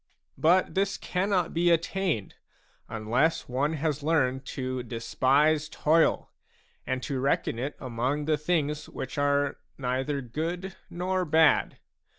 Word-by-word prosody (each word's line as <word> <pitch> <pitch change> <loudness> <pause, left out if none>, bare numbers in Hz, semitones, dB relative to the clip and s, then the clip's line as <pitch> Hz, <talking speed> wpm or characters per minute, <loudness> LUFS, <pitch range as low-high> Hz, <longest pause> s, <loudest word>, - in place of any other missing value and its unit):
But 180 +4 +3
this 195 0 0
cannot 185 -1 0
be 175 +1 +3
attained, 170 - 0 0.6
unless 115 +9 0
one 140 +5 0
has 150 -1 -1
learned 135 -4 +1
to 130 -1 -3
despise 140 +6 +1
toil 160 +2 +2 0.6
and 130 0 -2
to 140 -3 -2
reckon 130 -3 0
it 140 +4 -3
among 130 +4 -2
the 155 0 +2
things 150 -2 -1
which 130 - -5
are 145 0 +1 0.2
neither 135 +2 -1
good 170 +9 -4
nor 185 +1 -1
bad. 160 -1 +3
150 Hz, 125 wpm, -28 LUFS, 130-165 Hz, 0.6 s, But